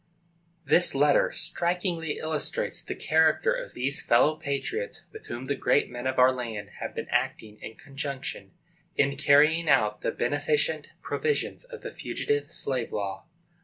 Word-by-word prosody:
This 175 - +4
letter 145 +1 +4
strikingly 170 -1 0
illustrates 155 -2 -1
the - - -6
character 160 - +3
of - - -6
these 135 +2 -1
fellow 150 +6 +4
patriots 155 - -3
with 435 - -12
whom 120 +2 -6
the 140 - 0
great 140 - +1
men 120 +1 -4
of 130 - -2
our 130 0 +6
land 115 -5 -5
have - - -5
been - - -3
acting 105 -1 -1
in 110 - -8
conjunction, 135 -8 -6 0.5
in 140 0 +2
carrying 150 +3 +4
out 105 0 +3
the - - 0
beneficent 145 +3 0
provisions 460 +2 -2
of 485 -2 -10
the - - -5
Fugitive 435 0 -2
Slave 130 -4 -1
Law. 100 -2 -4
145 Hz, 150 wpm, -27 LUFS, 125-165 Hz, 0.5 s, our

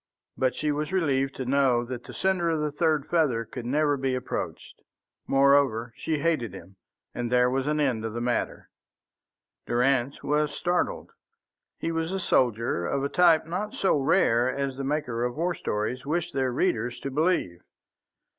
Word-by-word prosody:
But 130 -1 0
she 150 -1 -1
was 150 +3 -2
relieved 135 -7 +1
to 130 - -4
know 130 -2 +2
that 125 0 -7
the - - -10
sender 185 -3 +1
of 160 -1 0
the 150 -1 -1
third 155 -1 +1
feather 135 -9 +1
could 120 +2 -7
never 145 +2 +2
be 130 -1 -1
approached. 125 - -5 0.5
Moreover, 135 -4 +3
she 160 - -2
hated 145 - -1
him, 95 +1 -12 0.4
and 120 -1 -3
there 125 0 +4
was 135 +1 -1
an 150 0 +1
end 130 -7 +1
of 115 -1 -4
the 120 - -3
matter. 120 0 -2 1.0
Durrance 125 +2 +1
was 150 0 0
startled. 180 - -1 0.7
He 165 - -2
was 165 +1 -2
a 195 - -2
soldier 115 - +1
of 140 +6 -1
a 140 - 0
type 170 -2 +4
not 200 +6 -4
so 195 - +2
rare 130 -5 +3
as 135 0 -2
the 135 - -5
makers 125 -4 -1
of 125 - -11
war 175 +2 0
stories 110 0 -3
wish 170 +4 -2
their 130 -2 0
readers 120 0 -1
to 140 - -4
believe. 145 - 0
135 Hz, 175 wpm, -26 LUFS, 120-155 Hz, 1.0 s, there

